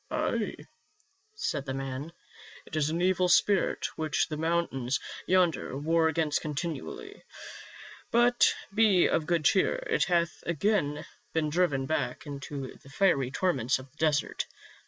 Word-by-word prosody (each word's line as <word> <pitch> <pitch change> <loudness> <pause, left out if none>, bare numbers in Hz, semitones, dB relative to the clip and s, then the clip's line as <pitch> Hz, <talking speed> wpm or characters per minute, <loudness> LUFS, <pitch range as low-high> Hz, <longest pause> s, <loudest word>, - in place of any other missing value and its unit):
"Ay," - - -1 0.8
said 145 - -3
the 135 - -2
man, 135 +3 -5 0.5
"it - - -8
is 155 -1 +1
an 170 +3 -1
evil 185 -1 +2
spirit 195 +1 +3
which 155 0 0
the 155 - -3
mountains 155 -5 0 0.3
yonder 175 -7 +2
war 160 +3 +2
against 160 -2 0
continually. 155 +2 -5 0.9
But 240 +1 +4 0.2
be 210 -4 +5
of 160 -2 +1
good 170 -3 +1
cheer, 195 - +3
it - - +1
hath 170 -2 0
again 170 -3 0 0.3
been 155 -2 0
driven 150 -6 +1
back 145 -3 -2
into 140 -2 -6
the 135 - -16
fiery 140 -5 +2
torments 135 -5 +1
of 130 0 -12
the 155 - -32
desert. 150 -2 0
160 Hz, 135 wpm, -29 LUFS, 140-175 Hz, 0.9 s, be